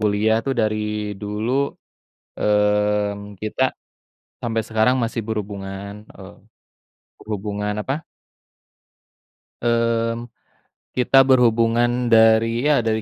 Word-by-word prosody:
kuliah 105 Hz, +1 st, +2 dB
tuh 135 Hz, -, 0 dB
dari 110 Hz, -1 st, +1 dB, 0.4 s
dulu, 105 Hz, +2 st, -3 dB, 0.9 s
mmm, 105 Hz, 0 st, +1 dB
kita 110 Hz, +4 st, -4 dB, 0.8 s
sampai 115 Hz, -1 st, -1 dB
sekarang 110 Hz, +3 st, +2 dB
masih 115 Hz, 0 st, -2 dB
berhubungan, 100 Hz, -2 st, -5 dB, 0.2 s
eee, -, -, -11 dB, 0.9 s
berhubungan 105 Hz, 0 st, -4 dB
apa 135 Hz, -, -2 dB, 1.7 s
mmm, 115 Hz, 0 st, 0 dB, 0.7 s
kita 135 Hz, +2 st, +5 dB
berhubungan 120 Hz, -1 st, +3 dB
dari 115 Hz, +1 st, +4 dB
ya 145 Hz, -, +4 dB
dari 110 Hz, -1 st, 0 dB
110 Hz, 90 wpm, -21 LUFS, 105-115 Hz, 1.7 s, kita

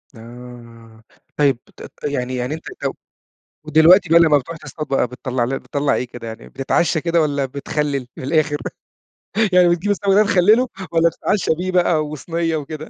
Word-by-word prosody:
آه. 115 Hz, -1 st, -13 dB, 0.3 s
طيب، 140 Hz, -4 st, +3 dB, 0.2 s
ت -, -, -14 dB
ت -, -, -14 dB
يعني 130 Hz, -3 st, -2 dB
يعني 125 Hz, +4 st, -3 dB
أنت 160 Hz, -, -7 dB, 0.2 s
لو -, -, -2 dB, 0.7 s
ودلوقتي 160 Hz, +4 st, +5 dB
بقى 170 Hz, +1 st, +6 dB
لمّا 155 Hz, -3 st, +5 dB
بتروح 165 Hz, +5 st, -6 dB
بقى -, -, -14 dB
تصطاد 155 Hz, -2 st, -6 dB
بقى 135 Hz, -2 st, +1 dB
بتطلّع 125 Hz, 0 st, -3 dB
ل 135 Hz, +2 st, -3 dB
بتطلّع 145 Hz, 0 st, -1 dB
إيه 125 Hz, -, -3 dB
كده؟ 120 Hz, -1 st, -9 dB
يعني 110 Hz, -, -9 dB
بتتعشّى 150 Hz, +4 st, 0 dB
كده 170 Hz, -1 st, +1 dB
والّا 140 Hz, -2 st, 0 dB
بتخلِّل 140 Hz, -1 st, -3 dB
في -, -, -9 dB
الآخر؟ 150 Hz, +1 st, +1 dB, 1.0 s
يعني 180 Hz, -1 st, +6 dB
بتجيب 175 Hz, +4 st, 0 dB
السَمَك 200 Hz, -1 st, +1 dB
ده 210 Hz, +2 st, +5 dB
تخلِّله 215 Hz, +5 st, +3 dB, 0.2 s
والّا 165 Hz, 0 st, +3 dB
بتتعشّى 195 Hz, +1 st, -1 dB
بيه 185 Hz, +1 st, -3 dB
بقى 175 Hz, -4 st, +2 dB
وصنية 165 Hz, +2 st, -3 dB
وكده؟ 155 Hz, +1 st, -6 dB
150 Hz, 175 wpm, -19 LUFS, 130-170 Hz, 1.0 s, بقى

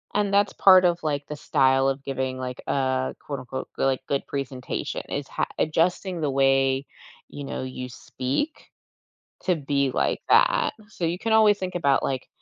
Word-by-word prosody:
And 205 Hz, -1 st, +1 dB
that's 200 Hz, 0 st, +3 dB
part 185 Hz, -1 st, +7 dB
of, 175 Hz, 0 st, +2 dB
like, 145 Hz, -2 st, -2 dB
the 150 Hz, -, -5 dB
style 135 Hz, -2 st, +2 dB
of 135 Hz, 0 st, -1 dB
giving, 130 Hz, -1 st, -3 dB
like, 125 Hz, -1 st, -5 dB
a 130 Hz, -1 st, 0 dB
quote 140 Hz, -3 st, -5 dB
unquote, 130 Hz, +1 st, -6 dB
like, 135 Hz, -1 st, +1 dB
good 140 Hz, -1 st, 0 dB
good -, -, -36 dB
presentation 135 Hz, -2 st, -4 dB
is -, -, -3 dB
h -, -, +3 dB
adjusting 175 Hz, +3 st, 0 dB
the 145 Hz, -2 st, 0 dB
way, 135 Hz, 0 st, +2 dB, 0.4 s
you 145 Hz, -, -8 dB
know, 135 Hz, -, -5 dB
you 130 Hz, -1 st, -6 dB
speak 130 Hz, -, -4 dB, 0.7 s
to 180 Hz, -, +2 dB
be 140 Hz, -3 st, 0 dB
like -, -, 0 dB
that. -, -, +4 dB, 0.2 s
So 180 Hz, -, -3 dB
you 170 Hz, +2 st, -1 dB
can 225 Hz, +1 st, 0 dB
always 215 Hz, -2 st, +5 dB
think 185 Hz, -1 st, -4 dB
about 140 Hz, -6 st, +2 dB
like 130 Hz, -2 st, -2 dB
140 Hz, 180 wpm, -25 LUFS, 130-175 Hz, 0.7 s, part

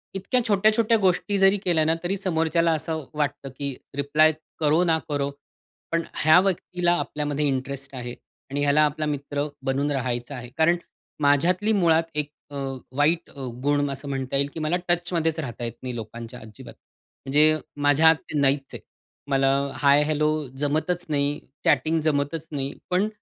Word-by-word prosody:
इतक्या 220 Hz, +6 st, 0 dB
छोट्या-छोट्या 215 Hz, +2 st, +3 dB
गोष्टी 195 Hz, +1 st, +1 dB
जरी 195 Hz, +1 st, +5 dB
केल्या 170 Hz, -3 st, +3 dB
ना, 160 Hz, -, +3 dB
तरी 195 Hz, +3 st, -1 dB
समोरच्याला 165 Hz, -2 st, +1 dB
असं 160 Hz, 0 st, -3 dB
वाटतं 145 Hz, -2 st, -2 dB
की 140 Hz, -2 st, -3 dB, 0.2 s
रिप्लाय 155 Hz, +3 st, +4 dB, 0.3 s
करो 155 Hz, +2 st, +3 dB
ना 165 Hz, -2 st, +3 dB
करो, 140 Hz, -1 st, 0 dB, 0.6 s
पण 165 Hz, 0 st, +1 dB
ह्या 155 Hz, +2 st, +6 dB
व्यक्तीला 180 Hz, -2 st, 0 dB
आपल्यामध्ये 150 Hz, 0 st, -2 dB
इंटरेस्ट 135 Hz, +1 st, -3 dB
आहे, 120 Hz, -1 st, -6 dB, 0.4 s
आणि 145 Hz, +1 st, -1 dB
ह्याला 145 Hz, +1 st, +4 dB
आपला 150 Hz, +1 st, -2 dB
मित्र 145 Hz, 0 st, -2 dB, 0.2 s
बनून 140 Hz, +2 st, 0 dB
राहायचं 125 Hz, 0 st, -2 dB
आहे. 120 Hz, -1 st, -8 dB
कारण 170 Hz, +2 st, +4 dB, 0.4 s
माझ्यातली 175 Hz, +9 st, +3 dB
मुळात 165 Hz, -4 st, +3 dB
एक 150 Hz, -1 st, -1 dB, 0.2 s
अ, 145 Hz, -, -8 dB, 0.4 s
वाईट 165 Hz, +4 st, +2 dB, 0.3 s
गुण 145 Hz, 0 st, +2 dB
असं 135 Hz, +1 st, -7 dB
म्हणता 135 Hz, -1 st, -3 dB
येईल 140 Hz, +1 st, +1 dB
की -, -, -6 dB
मला 155 Hz, +2 st, 0 dB
टचमध्येच 170 Hz, -2 st, 0 dB
राहता 120 Hz, -6 st, -5 dB
येत 115 Hz, -, -3 dB
नाही 125 Hz, -1 st, -4 dB
लोकांच्या 115 Hz, +2 st, -7 dB
अजिबात. 110 Hz, -1 st, -12 dB, 0.5 s
म्हणजे 150 Hz, +3 st, +4 dB, 0.3 s
माझ्यात 160 Hz, +3 st, +6 dB
ते 150 Hz, -, -2 dB
नाहीच 135 Hz, 0 st, +1 dB
आहे, -, -, -6 dB, 0.5 s
मला 135 Hz, 0 st, +3 dB, 0.3 s
हाय 145 Hz, +1 st, +5 dB
हेलो 150 Hz, 0 st, +1 dB, 0.3 s
जमतच 160 Hz, +5 st, -1 dB
नाही, 145 Hz, 0 st, +1 dB, 0.3 s
चॅटिंग 155 Hz, +3 st, +3 dB
जमतच 155 Hz, +1 st, -1 dB
नाही, 140 Hz, -1 st, -3 dB, 0.2 s
पण 185 Hz, +3 st, +2 dB
150 Hz, 155 wpm, -24 LUFS, 140-165 Hz, 0.6 s, ह्या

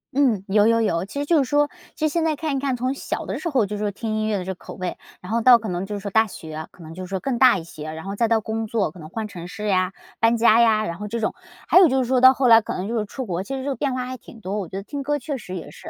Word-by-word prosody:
嗯， 250 Hz, -8 st, +2 dB
有 210 Hz, +2 st, +4 dB
有 230 Hz, 0 st, +3 dB
有。 175 Hz, -5 st, 0 dB
其 245 Hz, +8 st, -6 dB
实 -, -, -2 dB
就 315 Hz, -1 st, +4 dB
是 260 Hz, -, -3 dB
说， 290 Hz, +1 st, +3 dB, 0.3 s
其 310 Hz, -, -1 dB
实 -, -, +3 dB
现 325 Hz, +2 st, 0 dB
在 315 Hz, -1 st, +1 dB
看 300 Hz, -1 st, -2 dB
一 -, -, -1 dB
看， 270 Hz, -1 st, -1 dB
从 255 Hz, +2 st, -1 dB
小 275 Hz, -, -4 dB
的 -, -, -4 dB
时 345 Hz, -, -3 dB
候 260 Hz, -8 st, +2 dB
就 210 Hz, +1 st, -5 dB
是 -, -, -6 dB
说 205 Hz, -, 0 dB
听 220 Hz, +2 st, -4 dB
音 215 Hz, 0 st, 0 dB
乐 215 Hz, -2 st, 0 dB
的 185 Hz, -, -4 dB
这 190 Hz, -, -4 dB
个 -, -, -15 dB
口 -, -, -11 dB
味， 185 Hz, -1 st, -4 dB, 0.2 s
然 180 Hz, -, -8 dB
后 230 Hz, -, +2 dB
到 245 Hz, +1 st, +7 dB
可 220 Hz, -1 st, -6 dB
能 180 Hz, +1 st, -2 dB
就 205 Hz, +1 st, -5 dB
是 -, -, -4 dB
说 200 Hz, 0 st, -5 dB
大 220 Hz, +2 st, +4 dB
学， 155 Hz, -5 st, -8 dB
可 175 Hz, -, -15 dB
能 160 Hz, 0 st, -9 dB
就 185 Hz, +2 st, -7 dB
是 -, -, -10 dB
说 190 Hz, -1 st, -3 dB
更 265 Hz, -3 st, -1 dB
大 255 Hz, -4 st, +6 dB
一 170 Hz, -, -6 dB
些， 155 Hz, -2 st, -8 dB
然 160 Hz, 0 st, -7 dB
后 195 Hz, -, -5 dB
再 230 Hz, -, +2 dB
到 225 Hz, -1 st, +2 dB
工 220 Hz, +1 st, -3 dB
作， 210 Hz, -6 st, 0 dB
可 180 Hz, -, -14 dB
能 155 Hz, -, -9 dB
换 215 Hz, +5 st, -5 dB
城 175 Hz, -3 st, -8 dB
市 210 Hz, +3 st, -5 dB
呀、 185 Hz, -1 st, +1 dB, 0.3 s
搬 230 Hz, +1 st, +4 dB
家 230 Hz, -1 st, +5 dB
呀， 220 Hz, -2 st, +4 dB
然 170 Hz, -3 st, -4 dB
后 210 Hz, -, -6 dB
这 230 Hz, +2 st, -3 dB
种， 220 Hz, -, 0 dB, 0.3 s
还 -, -, +7 dB
有 370 Hz, -, +8 dB
就 265 Hz, -2 st, +1 dB
是 245 Hz, -, -5 dB
说 260 Hz, -1 st, +3 dB
到 260 Hz, +1 st, +8 dB
后 260 Hz, -1 st, +2 dB
来 225 Hz, -1 st, +9 dB
可 215 Hz, -, -5 dB
能 190 Hz, +3 st, -4 dB
就 235 Hz, -, -1 dB
是 210 Hz, -, -2 dB
出 260 Hz, +5 st, -6 dB
国， 180 Hz, -4 st, -2 dB
其 270 Hz, +7 st, -5 dB
实 265 Hz, -, -4 dB
这 285 Hz, -, -2 dB
个 275 Hz, -, -1 dB
变 275 Hz, -3 st, -1 dB
化 255 Hz, 0 st, -2 dB
还 255 Hz, +1 st, -6 dB
挺 230 Hz, -1 st, -15 dB
多， 200 Hz, +2 st, -3 dB
我 190 Hz, -, -4 dB
觉 175 Hz, -, -10 dB
得 195 Hz, -, -4 dB
听 285 Hz, +7 st, -5 dB
歌 290 Hz, +2 st, 0 dB
确 285 Hz, +1 st, -4 dB
实 185 Hz, -5 st, -8 dB
也 175 Hz, -, -7 dB
是。 -, -, -11 dB
220 Hz, 385 characters per minute, -23 LUFS, 190-260 Hz, 0.3 s, 来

